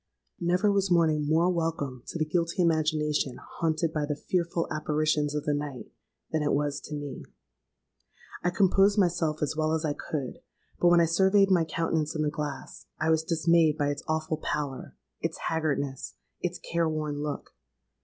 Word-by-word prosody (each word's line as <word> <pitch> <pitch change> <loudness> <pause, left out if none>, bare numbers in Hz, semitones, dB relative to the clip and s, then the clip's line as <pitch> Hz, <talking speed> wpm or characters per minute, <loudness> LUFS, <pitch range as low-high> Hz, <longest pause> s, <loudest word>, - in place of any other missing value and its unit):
"Never 180 +4 +2
was 195 -1 +1
morning 160 -4 +3
more 160 +3 +3
welcome 160 -7 -1
to - - -5
the 155 - +1
guilty 170 +3 0
imagination 155 -4 +1 0.2
haunted 160 0 0
by 150 -1 -1
the 150 - -1
fearful 170 +2 -1
apparitions 155 -1 0
of 150 - -1
the 150 - 0
night, 145 -3 -5 0.4
than 160 - 0
it 145 - +1
was 145 0 0
to 150 - -5
me. 145 -2 -6 1.2
I 175 - +3
composed 195 +2 +3
myself 170 -5 +1
as 150 - -1
well 155 0 +1
as 160 0 0
I 150 - 0
could; 145 -3 -5 0.4
but 175 - +4
when 175 0 +6
I - - +5
surveyed 190 +4 +4
my 175 -3 +4
countenance 160 -1 -1
in 155 - 0
the 150 - 0
glass, 145 -3 -6
I 160 +1 +2
was 160 0 +2
dismayed 165 -1 +3
by 145 -2 +1
its 145 0 -3
awful 155 0 -1
pallor—its 135 - -5
haggardness—its 155 +3 -3
care 170 -1 +2
worn 150 -2 -3
look. 150 -1 -5
155 Hz, 165 wpm, -28 LUFS, 150-170 Hz, 1.2 s, when